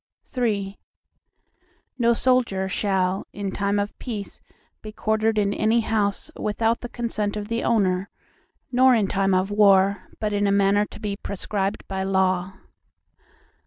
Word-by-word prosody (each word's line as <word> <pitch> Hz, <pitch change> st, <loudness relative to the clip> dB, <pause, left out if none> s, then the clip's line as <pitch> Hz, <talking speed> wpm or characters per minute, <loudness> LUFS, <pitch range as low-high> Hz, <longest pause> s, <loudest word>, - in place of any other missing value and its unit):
III 205 Hz, -5 st, -1 dB, 1.2 s
No 235 Hz, 0 st, +4 dB
soldier 235 Hz, -7 st, +1 dB
shall, 190 Hz, -1 st, -1 dB
in 200 Hz, -1 st, -4 dB
time 200 Hz, +1 st, 0 dB
of 205 Hz, 0 st, -2 dB
peace 215 Hz, -6 st, -6 dB, 0.4 s
be 215 Hz, -, -8 dB
quartered 220 Hz, +1 st, 0 dB
in 200 Hz, -1 st, +2 dB
any 220 Hz, +3 st, +2 dB
house, 210 Hz, -3 st, -1 dB
without 225 Hz, +2 st, 0 dB
the 245 Hz, -, -7 dB
consent 215 Hz, -4 st, -3 dB
of 210 Hz, 0 st, -5 dB
the 230 Hz, +1 st, -1 dB
owner, 195 Hz, -4 st, +1 dB, 0.6 s
nor 255 Hz, 0 st, +5 dB
in 215 Hz, -3 st, +2 dB
time 195 Hz, 0 st, +1 dB
of 185 Hz, +2 st, 0 dB
war, 200 Hz, -2 st, +4 dB
but 215 Hz, -1 st, -1 dB
in 205 Hz, 0 st, +1 dB
a -, -, +2 dB
manner 200 Hz, +1 st, +3 dB
to -, -, -12 dB
be 205 Hz, -2 st, -3 dB
prescribed 200 Hz, 0 st, -3 dB
by 190 Hz, -1 st, -3 dB
law. 190 Hz, -1 st, +1 dB
205 Hz, 145 wpm, -24 LUFS, 195-220 Hz, 1.2 s, nor